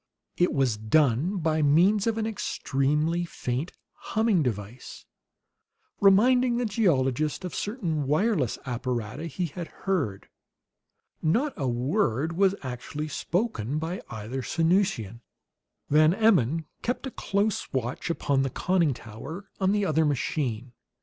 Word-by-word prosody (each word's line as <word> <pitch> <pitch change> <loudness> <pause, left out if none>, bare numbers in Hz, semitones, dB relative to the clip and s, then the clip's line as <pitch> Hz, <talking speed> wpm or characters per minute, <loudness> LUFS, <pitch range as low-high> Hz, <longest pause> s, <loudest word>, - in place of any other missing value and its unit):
It 175 - +2
was 130 -6 +1
done 140 - +2
by 160 -2 +1
means 180 +9 +4
of 225 -1 +1
an 220 - 0
extremely 155 -5 0
faint 140 -2 -3 0.2
humming 220 -5 +1
device, 115 -2 -5 0.9
reminding 240 +5 +5
the 245 - 0
geologist 155 - +1
of 180 - -5
certain 170 - -2
wireless 155 - +1
apparata 125 +2 -3
he 165 +4 -2
had 170 +2 -6 0.2
heard. 145 - -1 0.9
Not 240 - +1
a 135 - -2
word 135 - 0
was 195 +1 +3
actually 140 +4 -5
spoken 150 - -2
by 165 +4 -3
either 110 +4 -5
Sanusian. 165 - 0 0.7
Van 155 +3 +5
Emmon 165 - +3 0.2
kept 245 +3 -2
a 265 - -4
close 200 -1 -1
watch 125 +4 -3
upon 140 -4 +1
the 135 - 0
conning 170 -1 +1
tower 135 - -9
on 190 0 +2
the 205 -1 +1
other 160 -2 +2
machine. 130 -4 -1
155 Hz, 125 wpm, -27 LUFS, 130-195 Hz, 0.9 s, reminding